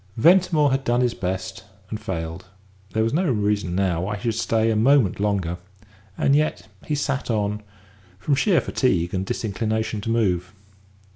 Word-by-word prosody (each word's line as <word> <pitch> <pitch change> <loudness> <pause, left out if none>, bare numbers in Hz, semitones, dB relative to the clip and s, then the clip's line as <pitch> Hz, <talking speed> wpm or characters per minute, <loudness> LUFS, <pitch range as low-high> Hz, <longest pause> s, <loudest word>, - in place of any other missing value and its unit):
Ventimore 165 0 +4
had 135 +1 0
done 120 0 +1
his 125 -2 +1
best, 95 0 -4 0.3
and 110 - -3
failed; 80 -4 -5 0.5
there 110 - +2
was 115 - 0
no 170 +1 +1
reason 105 -5 0
now 90 -3 +1
why 105 +3 -2
he 105 - -10
should 115 - 0
stay 115 0 +1
a - - 0
moment 120 -3 +3
longer 95 -4 -1 0.6
and 140 - +3
yet 155 +1 0 0.2
he 150 - 0
sat 140 -2 -2
on, 105 -2 -1 0.6
from 140 +9 -1
sheer 170 +5 +3
fatigue 90 -10 0
and 95 0 -2
disinclination 110 0 -2
to 115 - -4
move. 95 -5 0
110 Hz, 165 wpm, -23 LUFS, 95-130 Hz, 0.6 s, Ventimore